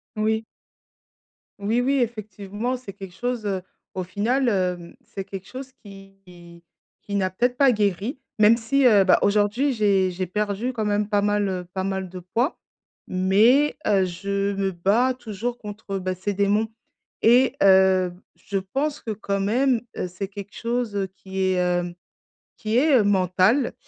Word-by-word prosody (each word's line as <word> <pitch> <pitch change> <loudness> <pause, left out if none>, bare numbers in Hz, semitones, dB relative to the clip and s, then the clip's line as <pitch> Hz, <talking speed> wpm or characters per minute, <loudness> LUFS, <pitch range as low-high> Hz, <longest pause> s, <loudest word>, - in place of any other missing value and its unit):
Oui. 220 +1 0 1.1
Oui, 215 +4 0
oui, 270 +3 +1
effectivement, 215 +1 -3
c'est 250 -5 -8
quelque 195 -2 -11
chose, 245 -3 -3
heu, 195 -2 -1 0.3
au 185 - -3
final, 235 +8 0
hem, 180 -4 -1
c'est 195 - -6
quelque 195 -1 -8
chose 260 +1 -8
qui 195 -1 -13
qui 170 -1 -15 0.4
qui 200 - -5
n'a 190 -2 +1
peut-être 245 +7 0
pas 270 0 +5
guéri, 210 - -1 0.2
même 215 +2 +6
si, 275 +4 +1
heu, 205 -5 +6
bah, 185 - +5
aujourd'hui, 210 +7 +2
j'ai 200 -5 +2
j'ai 185 +1 -3
perdu 210 +6 -2
quand 225 -3 -2
même 205 0 0
pas 205 -1 +1
mal, 205 0 +1
heu, 185 -2 -3
pas 190 -1 -2
mal 190 -1 -3
de 185 +1 -8
poids, 250 +8 0 0.5
mais 215 +12 +3
heu, 200 -2 +4
je 200 +3 -2
me 195 -1 -1
bats 210 +9 +2
toujours 240 0 -5
contre, 210 -2 -6
bah, 185 0 -2
ces 190 +3 -3
démons 205 +2 +1 0.5
et 250 +4 +5
heu, 190 -1 +5 0.2
je 200 - -4
pense 275 +11 -2
que 225 - -5
quand 200 -1 -2
même, 240 +5 +2 0.2
heu, - - -2
c'est 185 +2 -5
quelque 200 0 -10
chose 230 -5 -2
qui 190 0 -7
est, 190 0 +2
hem, 175 -1 0 0.6
qui 220 +1 0
est 270 -4 +5
mental, 195 +5 +2
205 Hz, 165 wpm, -24 LUFS, 190-235 Hz, 1.1 s, même